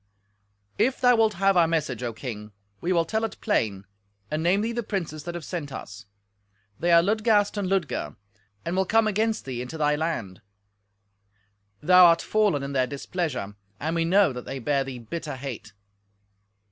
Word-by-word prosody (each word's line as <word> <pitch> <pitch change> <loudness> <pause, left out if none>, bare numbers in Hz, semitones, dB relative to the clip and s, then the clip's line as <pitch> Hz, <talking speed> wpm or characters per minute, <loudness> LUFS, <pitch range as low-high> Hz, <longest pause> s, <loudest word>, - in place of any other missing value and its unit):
"If 260 +2 +2
thou 245 -1 +5
wilt 220 -2 +2
have 195 +2 +3
our 170 -2 +5
message, 150 -7 -1
O 120 -1 -2
king, 110 -3 -7 0.3
we 175 - -2
will 170 -2 +3
tell 220 +6 -1
it 225 - -4
plain, 100 -3 -1 0.5
and 155 +1 -1
name 180 +5 +2
thee 225 +2 -1
the 240 0 -2
princes 170 -9 -4
that 175 0 -5
have 175 - -6
sent 155 -6 -5
us. 105 -4 -9 0.7
They 175 +1 +1
are 170 0 +7
Ludgast 210 +1 +2
and 200 -3 -2
Ludger, 190 -5 -1 0.5
and 170 - -2
will 190 0 +1
come 225 0 +3
against 215 +1 0
thee 125 -3 -4
into 125 +6 -6
they 150 -1 +2
land. 150 - -3 1.4
Thou 180 +2 +8
are 170 - +6
fallen 205 -8 +1
in 140 0 -5
their 130 -2 +2
displeasure, 140 - -4 0.2
and 160 +3 -2
we 165 - +1
know 185 -2 +4
that 125 -1 -7
they 135 - -5
bear 140 +2 0
thee 135 -2 -7
bitter 145 +6 -6
hate. 130 -5 -7
165 Hz, 180 wpm, -25 LUFS, 135-195 Hz, 1.4 s, Thou